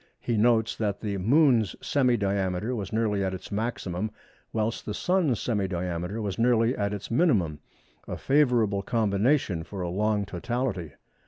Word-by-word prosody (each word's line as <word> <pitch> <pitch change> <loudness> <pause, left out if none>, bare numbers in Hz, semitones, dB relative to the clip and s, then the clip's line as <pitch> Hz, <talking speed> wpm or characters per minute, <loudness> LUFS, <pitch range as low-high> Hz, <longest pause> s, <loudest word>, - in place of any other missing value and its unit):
He 120 - -1
notes 115 0 +3
that 105 -2 -2
the 100 -3 -2
Moon's 120 - +3
semi 125 -4 +2
diameter 100 +2 -1
was 100 -4 -4
nearly 110 -3 +1
at 95 0 -1
its 95 - -10
maximum 105 -2 -2 0.4
whilst 110 +1 -1
the 105 - -3
Sun's 180 - +1
semi 105 -5 0
diameter 90 +3 -3
was 100 +1 -3
nearly 120 +1 +3
at 100 0 -1
its 105 +1 -6
minimum—a 95 - -1
favourable 120 -8 +2
combination 105 - +1
for 95 +2 -6
a 90 - -2
long 105 +2 0
totality. 110 - -3
105 Hz, 150 wpm, -27 LUFS, 95-120 Hz, 0.4 s, notes